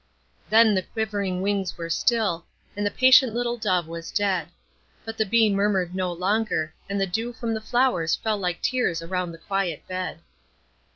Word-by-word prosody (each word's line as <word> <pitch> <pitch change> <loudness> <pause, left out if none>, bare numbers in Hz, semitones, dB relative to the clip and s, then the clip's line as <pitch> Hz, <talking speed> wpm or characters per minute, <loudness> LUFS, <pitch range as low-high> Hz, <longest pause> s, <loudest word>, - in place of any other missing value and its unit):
Then 220 0 +6
the 190 - +2
quivering 200 -3 -3
wings 195 -2 -1
were 165 -1 -5
still, 205 -4 +1 0.3
and 205 - -2
the 205 - +2
patient 255 0 +5
little 240 0 0
dove 185 -7 0
was 165 0 -7
dead; 195 -4 0 0.6
but 225 0 -5
the 220 -1 0
bee 225 +2 +4
murmured 195 -3 +1
no 185 -1 -1
longer, 185 -2 -1 0.2
and 200 0 -1
the 195 - +2
dew 225 +6 -3
from 230 -1 -3
the 220 - -3
flowers 240 -9 +1
fell 215 -2 -2
like 180 -3 -3
tears 175 -10 0
around 180 0 -2
the 165 - -10
quiet 185 -3 -3
bed. 185 -2 -4
200 Hz, 175 wpm, -25 LUFS, 180-225 Hz, 0.6 s, Then